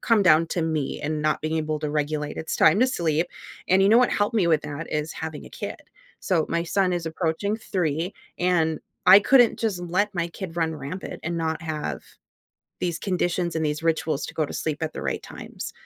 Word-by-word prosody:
come 225 -3 +3
down 165 -3 +5
to 170 - -1
me 155 -4 -2
and 155 +1 -2
not 155 0 +1
being 155 +1 -1
able 155 -1 -1
to 150 -1 -2
regulate, 150 0 -2
"It's 160 - -3
time 160 +6 +5
to 255 - +5
sleep," 170 - 0 0.4
and 190 +1 +4
you 195 - +5
know 225 +3 +7
what 250 - +4
helped 205 +3 0
me 195 -5 +3
with 160 -3 +3
that 150 +2 -6
is 150 +1 -1
having 160 -2 -6
a - - -12
kid. - - -6 0.4
So, 170 -4 +1
my 170 0 0
son 185 +1 +1
is 175 -1 -2
approaching 165 +5 -1
3, 175 -4 -2 0.2
and 165 -3 +2 0.3
I 190 +2 +11
couldn't 245 +2 +5
just 210 -6 -1
let 185 +4 0
my 170 -1 -1
kid 170 -1 -8
run 160 -1 0
rampant 150 +6 -6
and 170 +1 -2
not 160 -1 -1
have 155 -2 -4 0.8
these 170 -2 -2
conditions 175 -2 -1
and 160 -1 0
these 150 +1 -1
rituals 160 -2 0
to - - -9
go 155 - 0
to - - -9
sleep 155 0 -2
at 155 - -2
the - - -7
right - - -2
times, - - -8
165 Hz, 215 wpm, -25 LUFS, 155-185 Hz, 0.8 s, I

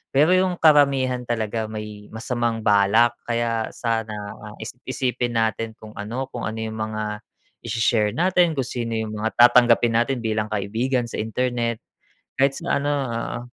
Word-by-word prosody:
Pero 150 +5 +5
yung 185 0 +3
karamihan 140 -5 +4
talaga 110 -1 -2
may 105 -1 -7
masamang 115 0 -2
balak, 105 +4 +4 0.2
kaya 115 -1 0
sana, 115 -2 -2 0.3
ah, 105 0 -10
isip-isipin 125 0 -3
natin 110 0 0
kung 110 - -12
ano, 115 +6 -4
kung 120 - -4
ano 110 - -4
yung 110 0 -4
mga 110 -1 -3 0.5
isi-share 110 -2 +1
natin, 175 -1 +3
kung 135 - +1
sino 120 -3 -3
yung 110 -1 -3
mga 110 +1 -2
tatanggapin 120 -1 +5
natin 120 +3 +2
bilang 110 -1 0
kaibigan 115 +5 -1
sa - - -5
internet, 120 +1 -1 0.6
kahit 135 +1 +3
sa 170 -3 0
ano 145 - 0
oo. 130 -7 -2
115 Hz, 150 wpm, -23 LUFS, 110-130 Hz, 0.6 s, Pero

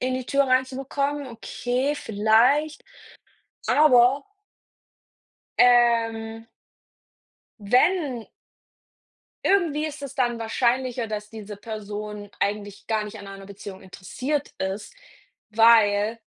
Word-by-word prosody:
in 255 0 -1
die 255 -1 -4
Tür 280 0 +2
reinzubekommen.“ 270 +2 -1
Okay, 250 +4 -2
vielleicht, 240 +7 +2 0.9
aber 270 -2 +5 1.4
ähm 230 -2 +3 1.1
wenn 250 - +1 1.2
irgendwie 320 -6 +2
ist 300 -1 -8
es 275 -1 -7
dann 240 -3 0
wahrscheinlicher, 240 +1 0
dass 210 -1 -6
diese 210 -2 -9
Person 210 -1 -7
eigentlich 205 0 -3
gar 220 -1 0
nicht 210 +1 -9
an 200 - -10
einer 195 0 -10
Beziehung 200 -1 -10
interessiert 255 +10 -4
ist, 190 - -4 0.6
weil 220 -1 +4
235 Hz, 95 wpm, -24 LUFS, 210-265 Hz, 1.4 s, aber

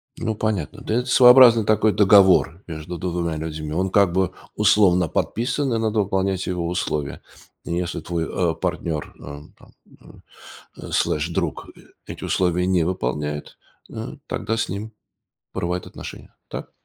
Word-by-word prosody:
Ну, 110 -1 -3
понятно. 105 -8 -3
Да, 110 - -2
это 125 +1 0
своеобразный 125 -3 +7
такой 110 0 +3
договор 95 -3 +5
между 80 +1 -6
2 85 -2 -2
людьми, 75 -1 -5
он 95 +3 0
как 100 -4 +3
бы 95 0 +1 0.2
условно 100 -4 +4
подписан 125 - -1
и - - +1
надо 110 -1 0
выполнять 95 -1 -1
его 90 -2 -2
условия. 75 -5 -3 0.4
И - - -4
если 90 0 -2
твой, 85 -2 -3
э, 85 0 -1
партнер, 85 -3 -3
э, 70 0 -9 0.2
там, - - -20 0.6
э, - - -9
слеш, 75 +2 0
друг 85 - -3
э - - -17 0.3
эти - - -8
условия 90 -1 +1
не 90 -3 +2
выполняет, 75 -3 -3 0.3
э, - - -7
тогда 115 +3 -2
с 115 - -1
ним 105 +4 -6 0.6
порывают 90 +1 -3
отношения, - - -10
так? - - -7
90 Hz, 150 wpm, -22 LUFS, 85-105 Hz, 0.6 s, своеобразный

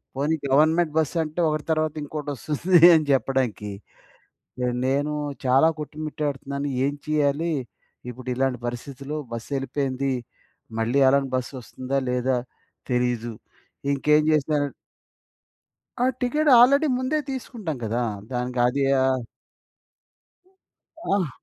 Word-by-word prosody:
పోనీ 145 +4 +1
గవర్నమెంట్ 155 +3 +3
బసంటే 160 +1 -1
ఒకటి 155 0 -2
తర్వాత 155 -1 +1
ఇంకోటొస్తుంది 150 +4 0 0.2
అని 155 -1 +2
చెప్పడానికి. 125 -5 0 0.9
ఆహ్, 125 0 0
నేను 145 +3 0 0.3
చాలా 135 +5 +5
కొట్టుమిట్టాడుతున్నాను. 145 -2 -4 0.2
ఏం 145 - -1
చేయాలి? 155 +2 +1 0.6
ఇప్పుడిలాంటి 130 +1 -2
పరిస్థితుల్లో 135 +4 -5
బస్ 115 -1 -6
యెళ్ళిపోయింది. 135 0 -2 0.7
మళ్ళీ 120 +5 +2
అలాంటి 135 0 +2
బస్సొస్తుందా? 130 +1 -4
లేదా? 125 +1 +1 0.5
తెలీదు. 125 -1 0 0.6
ఇంకేం 150 +2 +3
చేశనన్ 145 -1 +1 1.3
ఆ! - - +4 0.2
టికెట్ 300 +5 +1
ఆల్రెడీ 280 +5 +6
ముందే 260 +4 0
తీసుకుంటాం 230 - -5
గదా! 115 +3 -1 0.3
దానికి 125 0 -3
అది 140 +3 0 0.2
ఆహ్ 130 -2 +1 1.9
అహ్, 190 -5 +1
140 Hz, 100 wpm, -24 LUFS, 130-155 Hz, 1.9 s, ఆల్రెడీ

